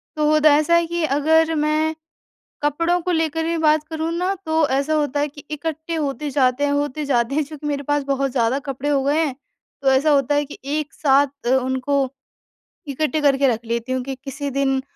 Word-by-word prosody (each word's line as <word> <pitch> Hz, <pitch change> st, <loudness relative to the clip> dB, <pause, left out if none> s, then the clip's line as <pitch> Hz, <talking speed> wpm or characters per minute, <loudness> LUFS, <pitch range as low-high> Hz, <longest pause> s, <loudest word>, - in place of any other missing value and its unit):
तो 305 Hz, 0 st, +3 dB
द 305 Hz, -, -1 dB
ऐसा 305 Hz, +3 st, +5 dB
है 340 Hz, 0 st, +3 dB
कि 340 Hz, -1 st, -2 dB
अगर 320 Hz, +3 st, +2 dB
मैं 310 Hz, +1 st, +1 dB, 0.7 s
कपड़ों 335 Hz, +5 st, +1 dB
को 360 Hz, -, -2 dB
लेकर 320 Hz, -1 st, 0 dB
ही 335 Hz, 0 st, -1 dB
बात 310 Hz, -1 st, +3 dB
करूँ 320 Hz, +1 st, -3 dB
ना 370 Hz, +2 st, 0 dB
तो 315 Hz, -1 st, +2 dB
ऐसा 275 Hz, +4 st, 0 dB
होता 290 Hz, -2 st, 0 dB
है 295 Hz, -, +1 dB
कि 290 Hz, 0 st, -13 dB
इकट्ठे 320 Hz, +2 st, -4 dB
होते 295 Hz, -1 st, -2 dB
जाते 260 Hz, 0 st, +2 dB
हैं 285 Hz, -, 0 dB
होते 290 Hz, +1 st, -1 dB
जाते 245 Hz, 0 st, +1 dB
हैं, 310 Hz, -, +2 dB
चूँकि 300 Hz, 0 st, -8 dB
मेरे 285 Hz, -1 st, -2 dB
पास 290 Hz, -1 st, +1 dB
बहुत 275 Hz, -1 st, -1 dB
ज़्यादा 245 Hz, +2 st, +1 dB
कपड़े 275 Hz, +2 st, -3 dB
हो 275 Hz, -2 st, +2 dB
गए 290 Hz, +3 st, +1 dB
हैं, 265 Hz, -3 st, -4 dB, 0.5 s
तो 270 Hz, -1 st, +3 dB
ऐसा 275 Hz, +4 st, +3 dB
होता 285 Hz, 0 st, +2 dB
है 290 Hz, 0 st, +1 dB
कि 290 Hz, -, -11 dB
एक 295 Hz, +1 st, -3 dB
साथ 280 Hz, -1 st, +3 dB, 0.2 s
अ, -, -, +1 dB
उनको 260 Hz, +1 st, 0 dB, 0.8 s
इकट्ठे 305 Hz, +2 st, -1 dB
करके 275 Hz, -1 st, +3 dB
रख 230 Hz, -1 st, -1 dB
लेती 235 Hz, +2 st, -3 dB
हूँ 255 Hz, -1 st, -1 dB
कि 270 Hz, 0 st, -5 dB
किसी 280 Hz, +1 st, -4 dB
दिन 270 Hz, 0 st, +1 dB
290 Hz, 210 wpm, -21 LUFS, 275-310 Hz, 0.8 s, ऐसा